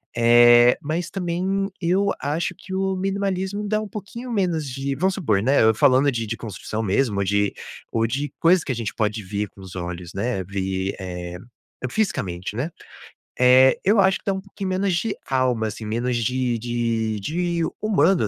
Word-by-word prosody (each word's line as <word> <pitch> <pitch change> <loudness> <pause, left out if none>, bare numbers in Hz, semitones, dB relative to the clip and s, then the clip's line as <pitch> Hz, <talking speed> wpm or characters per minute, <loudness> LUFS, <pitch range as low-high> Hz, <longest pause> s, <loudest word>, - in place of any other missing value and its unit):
Eh, 120 +1 +6
mas 165 +2 -3
também 190 +2 -1
eu 190 +4 +2
acho 160 +5 -1
que 190 - -13
o 190 0 0
minimalismo 195 +1 -2
dá 215 +1 0
um 215 - -5
pouquinho 215 +5 -7
menos 180 -7 0
de 135 +2 -3
vamos 190 +7 +1
supor, 110 - +1
né, 135 +2 +4
eu 110 0 +5
falando 135 +4 +4
de 115 -3 -3
de 115 +2 -3
construção 110 0 -5
mesmo 105 +1 +1
ou - - +2
de 100 +1 +1 0.4
ou 115 0 +1
de 135 +4 -3
coisa 175 +1 +4
que - - -3
a - - -1
gente 115 -2 -4
pode 105 -1 -1
ver 100 +2 -3
com - - -21
os 95 -1 -10
olhos, 90 -1 -6
né, 100 0 -2
ver, 95 0 -3
eh, 90 -2 -6 0.5
fisicamente, 105 - -2
né. 130 +8 -2 0.7
Eh, 130 +1 +6
eu 205 +2 +4
acho 190 0 +3
que - - -29
dá 200 - +1
um 190 - -4
pouquinho 195 -1 -6
menos 190 0 0
de 205 +5 -1
alma, 125 -4 +1
assim, 110 0 -6
menos 120 +3 -1
de 125 +1 0
de 115 -2 -1
de 170 - -1 0.2
humano, 190 - +3
130 Hz, 185 wpm, -23 LUFS, -, 0.7 s, Eh